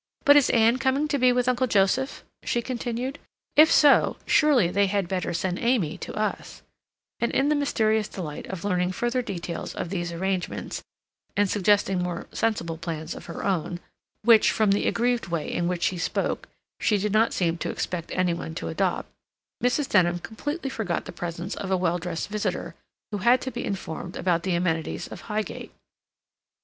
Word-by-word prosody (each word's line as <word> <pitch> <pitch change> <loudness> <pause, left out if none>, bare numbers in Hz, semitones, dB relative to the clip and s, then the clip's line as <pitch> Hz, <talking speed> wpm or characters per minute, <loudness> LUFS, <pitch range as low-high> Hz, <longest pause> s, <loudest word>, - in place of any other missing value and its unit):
"But 285 - +8
is 290 -3 +5
Ann 230 +1 +4
coming 270 +3 +1
to 285 -2 0
be 250 0 +5
with 245 0 +1
Uncle 255 0 +2
Joseph?" 225 +6 +1 0.2
she 240 - -1
continued. 250 +2 -3 0.4
"If 310 +2 +7
so, 295 -2 +5
surely 285 - +4
they 200 +2 +2
had 195 -2 0
better 185 0 -2
send 180 +1 -2
Amy 235 -10 +1
to - - -6
us—" 215 0 -3 0.6
and 235 - 0
in 275 +2 +2
the 300 - +3
mysterious 220 -7 +1
delight 160 -8 -6
of 190 -3 -6
learning 180 -2 0
further 240 +5 0
details 175 -6 -5
of - - -4
these 175 -3 -2
arrangements, 185 +1 -3 0.6
and 205 0 +4
suggesting 195 -1 +2
more 180 -1 -3
sensible 170 -8 -1
plans 165 -1 -4
of - - -10
her - - -6
own, 175 -2 -1 0.4
which, 225 -1 +6
from 215 -2 +2
the 200 - +2
aggrieved 240 -4 +1
way 170 -3 -3
in 175 - 0
which 180 -1 -2
she 180 - 0
spoke, - - -2 0.3
she 210 - +2
did 205 +1 -1
not 225 +1 +4
seem 170 -2 0
to - - -2
expect 170 -2 -3
any 185 -2 +1
one 160 -1 -6
to 80 - -4
adopt, 80 - -1 0.6
Mrs. 255 +3 +2
Denham 175 -7 +3
completely 275 - -4
forgot 205 -9 -2
the - - -7
presence 175 +2 -5
of 195 - -5
a 190 - +2
well 175 -1 0
dressed 175 +1 -4
visitor, 210 0 -2 0.4
who 205 - -2
had 240 +6 +5
to 260 - -4
be - - -4
informed 180 -2 -5
about 170 -2 +1
the 185 0 0
amenities 165 -2 -1
of - - -9
Highgate. 215 0 -3
200 Hz, 180 wpm, -26 LUFS, 175-240 Hz, 0.6 s, But